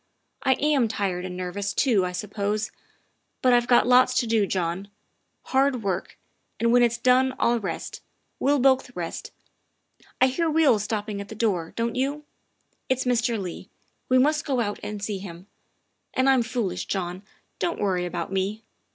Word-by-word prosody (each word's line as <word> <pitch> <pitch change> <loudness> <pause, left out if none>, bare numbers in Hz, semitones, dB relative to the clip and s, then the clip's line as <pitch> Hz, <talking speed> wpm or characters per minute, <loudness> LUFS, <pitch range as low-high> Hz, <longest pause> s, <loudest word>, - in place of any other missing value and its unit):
I 265 - +4
am 285 -4 +2
tired 190 -4 -2
and 180 -1 -6
nervous 200 +2 -3
too, 215 -9 +3
I - - -4
suppose, 205 +3 -2 0.7
but 255 -1 +5
I've 240 0 +3
got 245 - +5
lots 250 +1 +5
to - - +2
do, 220 -3 +2
John, 185 +1 -2 0.6
hard 265 -3 +1
work, 190 -2 -3 0.4
and 235 0 +2
when 245 - +6
it's 235 -1 +3
done 255 +1 +3
I'll 235 0 +2
rest. 200 - -5 0.4
We'll 285 +2 +3
both 260 -1 +2
rest. 170 -2 -5 0.9
I - - +6
hear 320 +6 0
wheels 300 -9 +3
stopping 210 -2 -3
at 200 - -8
the 220 - -7
door, 195 -7 -1
don't 230 0 -1
you? 280 +4 -1 0.7
It's 260 0 +1
Mr. 235 -2 +1
Leigh; 180 -3 -7 0.4
we 255 - +5
must 300 +4 +3
go 270 -4 -1
out 205 -3 -2
and 210 -1 -6
see 205 -2 -3
to - - -10
him. 175 -1 -9 0.7
And 260 +1 +2
I'm 265 -2 +5
foolish, 225 -7 -2
John 180 -1 -3 0.4
don't 340 - -1
worry 185 -3 0
about 175 - -4
me. 195 +3 -2
225 Hz, 170 wpm, -25 LUFS, 195-255 Hz, 0.9 s, when